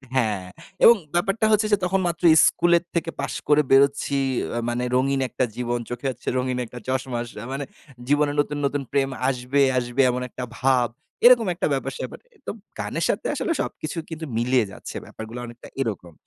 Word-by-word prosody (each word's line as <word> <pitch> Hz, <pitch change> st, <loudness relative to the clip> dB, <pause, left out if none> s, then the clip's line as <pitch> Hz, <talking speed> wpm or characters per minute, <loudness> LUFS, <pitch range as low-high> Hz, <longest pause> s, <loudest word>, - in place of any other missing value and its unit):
হ্যাঁ, 105 Hz, -7 st, +1 dB, 0.4 s
এবং 235 Hz, -, +10 dB, 0.2 s
ব্যাপারটা 195 Hz, +5 st, +1 dB
হচ্ছে 215 Hz, 0 st, +3 dB
যে -, -, +6 dB
তখন 190 Hz, +2 st, +1 dB
মাত্র 170 Hz, +1 st, -4 dB, 0.2 s
স্কুলের 170 Hz, 0 st, +3 dB
থেকে 165 Hz, 0 st, 0 dB
পাশ -, -, -3 dB
করে 150 Hz, 0 st, +5 dB
বেরোচ্ছি 140 Hz, +1 st, +4 dB, 0.4 s
আ -, -, +1 dB
মানে 120 Hz, +1 st, -1 dB
রঙিন 135 Hz, +1 st, +2 dB
একটা 130 Hz, -, 0 dB
জীবন 120 Hz, 0 st, -1 dB
চোখে 120 Hz, +2 st, -6 dB
হচ্ছে 125 Hz, -, -15 dB
রঙিন 125 Hz, 0 st, -1 dB
একটা 120 Hz, +2 st, -10 dB
চশমা। 130 Hz, -2 st, -1 dB, 0.3 s
মানে 140 Hz, +1 st, -3 dB, 0.4 s
জীবনে 145 Hz, +1 st, +3 dB
নতুন, 145 Hz, 0 st, 0 dB
নতুন 140 Hz, 0 st, 0 dB
প্রেম 135 Hz, -1 st, +1 dB, 0.2 s
আসবে, 130 Hz, +2 st, 0 dB, 0.2 s
আসবে 120 Hz, +2 st, +1 dB
এমন 125 Hz, +1 st, -1 dB
একটা 125 Hz, -, -6 dB, 0.2 s
ভাব 125 Hz, -2 st, +3 dB, 0.4 s
এরকম 240 Hz, -3 st, +7 dB
একটা 175 Hz, -, -1 dB
ব্যাপার 135 Hz, -, -2 dB
সেপার। -, -, -6 dB, 0.3 s
তো -, -, -1 dB, 0.3 s
গানের -, -, -2 dB
সাথে -, -, -1 dB
আসলে 345 Hz, -, -2 dB
সবকিছু 155 Hz, +2 st, -5 dB
কিন্তু 160 Hz, 0 st, -6 dB
মিলিয়ে 120 Hz, -1 st, +2 dB
যাচ্ছে -, -, -9 dB
ব্যাপারগুলো 110 Hz, +2 st, -8 dB
অনেকটা 120 Hz, 0 st, -11 dB
এরকম। 100 Hz, -8 st, -4 dB
135 Hz, 175 wpm, -24 LUFS, 125-155 Hz, 0.4 s, এবং